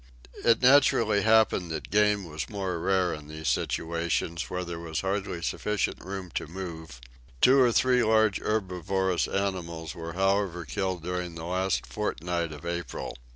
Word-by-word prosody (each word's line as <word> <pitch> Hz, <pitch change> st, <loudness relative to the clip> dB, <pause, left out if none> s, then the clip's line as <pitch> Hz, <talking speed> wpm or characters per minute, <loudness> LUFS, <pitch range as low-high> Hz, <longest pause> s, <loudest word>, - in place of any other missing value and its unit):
It 115 Hz, +1 st, +4 dB
naturally 120 Hz, -6 st, +5 dB
happened 110 Hz, -5 st, +3 dB
that 80 Hz, -1 st, -5 dB
game 105 Hz, -1 st, +3 dB
was 75 Hz, -5 st, -5 dB
more 95 Hz, -4 st, -3 dB
rare 95 Hz, 0 st, +1 dB
in 75 Hz, -1 st, -8 dB
those 80 Hz, 0 st, -6 dB
situations 85 Hz, 0 st, -1 dB
where 90 Hz, 0 st, -3 dB
there 85 Hz, -1 st, -5 dB
was 80 Hz, -2 st, -3 dB
hardly 95 Hz, -3 st, -2 dB
sufficient 105 Hz, +4 st, -1 dB
room 95 Hz, -2 st, -6 dB
to -, -, -3 dB
move; 80 Hz, -6 st, -7 dB, 0.4 s
two 135 Hz, -, +6 dB
or 125 Hz, -2 st, +5 dB
three 125 Hz, +1 st, +3 dB
large 110 Hz, -2 st, +3 dB
herbivorous 95 Hz, -3 st, 0 dB
animals 85 Hz, -5 st, -3 dB
were 85 Hz, 0 st, -7 dB
however 95 Hz, -2 st, 0 dB
killed 95 Hz, -2 st, -2 dB
during 90 Hz, -1 st, -3 dB
the 80 Hz, 0 st, -6 dB
last 95 Hz, +1 st, 0 dB
fortnight 85 Hz, 0 st, -2 dB
of 75 Hz, +2 st, -10 dB
April. 85 Hz, -4 st, -4 dB
90 Hz, 155 wpm, -28 LUFS, 85-100 Hz, 0.4 s, two